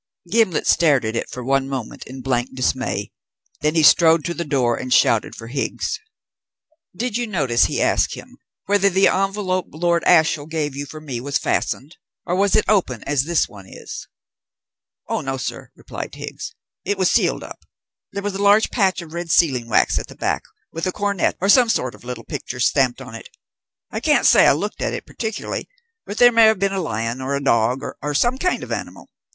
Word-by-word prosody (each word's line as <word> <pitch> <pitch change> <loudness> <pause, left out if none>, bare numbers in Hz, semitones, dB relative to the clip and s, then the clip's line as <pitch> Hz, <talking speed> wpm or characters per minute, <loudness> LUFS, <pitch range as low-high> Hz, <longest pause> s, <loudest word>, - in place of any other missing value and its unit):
Gimblet 220 -8 +2
stared 145 -8 +3
at 110 +1 -3
it - - -3
for 125 - -7
one 135 +1 0
moment 130 -5 -6
in 130 +1 -9
blank 125 -1 -1
dismay. 130 -5 -1 0.5
Then 150 +2 0
he 160 - +3
strode 160 0 +6
to 170 - -2
the 170 - -3
door 130 -6 +1
and 125 - -6
shouted - - +3
for 115 - -9
Higgs. 135 +4 -3 1.0
"Did 240 +2 -2
you 240 -1 -2
notice," 140 - +2
he - - -2
asked - - +1
him, - - -13 0.3
"whether 200 0 +3
the 190 +1 +4
envelope 195 -1 0
Lord 170 +2 0
Ashiel 160 -3 +4
gave 155 -3 -3
you 140 +1 -5
for 155 - -9
me 135 -6 -6
was 140 +2 -1
fastened, 150 +6 -2 0.3
or 175 - -1
was 200 +1 +2
it 215 - +3
open 170 - +1
as 140 -2 0
this 170 0 +1
one 100 -4 -14
is?" - - -9 1.0
"Oh - - -1
no, 135 0 -3
sir," 130 - -5
replied - - -8
Higgs, - - -7 0.3
"it 205 +1 -1
was 185 -2 +2
sealed - - +1
up. - - -11 0.5
There 200 - -5
was 205 -1 -2
a 195 - -4
large 205 +2 +4
patch 190 -5 +1
of 160 -1 -13
red 170 0 -5
sealing 135 -8 +3
wax 110 - +3
at - - -7
the - - -13
back, - - -1 0.3
with 165 +3 -3
a - - 0
coronet 200 -1 -1
and 195 +2 +4
some 245 -1 +5
sort 130 - 0
of - - -16
little 120 -1 -6
picture 130 - -6
stamped 130 0 +2
on 125 -3 -11
it. 115 - -10 0.6
I - - -3
can't - - +2
say - - +6
I - - +6
looked 205 +9 -4
at - - -1
it - - -7
particularly, 220 -2 -5 0.4
but 205 - -6
there 245 0 +7
may 230 -1 +6
have 220 0 +4
been 195 +1 0
a 195 - -1
lion 115 -3 -3
or 135 +2 -2
a 140 - -3
dog, 120 0 +2 0.2
or 145 0 -3
some 245 - +2
kind 365 +3 0
of - - -8
animal. - - -6
155 Hz, 205 wpm, -21 LUFS, 130-195 Hz, 1.0 s, there